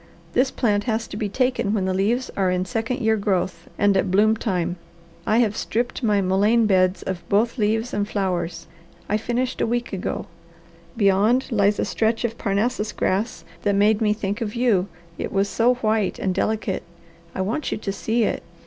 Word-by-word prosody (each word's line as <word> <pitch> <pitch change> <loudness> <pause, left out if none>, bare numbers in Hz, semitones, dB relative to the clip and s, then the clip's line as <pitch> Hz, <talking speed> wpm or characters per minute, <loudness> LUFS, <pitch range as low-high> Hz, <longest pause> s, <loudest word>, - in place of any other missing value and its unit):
This 260 +1 +3
plant 205 -6 0
has 225 -1 -1
to - - -7
be 210 -1 -2
taken 250 -2 0
when 195 -3 0
the 190 - 0
leaves 225 +7 0
are 190 -2 +1
in 180 0 0
second 225 +6 -2
year 220 -1 +2
growth 190 -3 -1
and 205 -1 +3
at 190 - +1
bloom 210 +4 +4
time. 180 -5 -2 0.5
I 215 - +3
have 220 -4 +2
stripped 240 +4 -2
my 210 -4 +2
mullein 205 +5 +3
beds 185 -2 +2
of 185 -2 -4
both 230 +5 +2
leaves 220 +3 0
and 205 0 0
flowers. 180 -4 -2 0.4
I 210 - +1
finished 245 +3 -2
a - - +2
week 240 -1 -2
ago. 190 - -3 0.7
Beyond 215 +6 +3
lies 205 -2 +3
a - - 0
stretch 225 +1 0
of 230 0 -4
Parnassus 210 +2 0
grass 205 +3 -1 0.2
that 200 -1 +1
made 205 +2 +3
me 215 -1 +3
think 210 +1 -2
of 215 -1 -3
you, 225 -6 +2 0.3
it - - -3
was 195 0 +1
so 240 +4 +2
white 215 -4 0
and 190 - -1
delicate. 210 0 -1 0.5
I - - -1
want 230 +10 -2
you - - -1
to 210 -2 -3
see 225 +4 0
it. - - -1
210 Hz, 190 wpm, -23 LUFS, 195-230 Hz, 0.7 s, bloom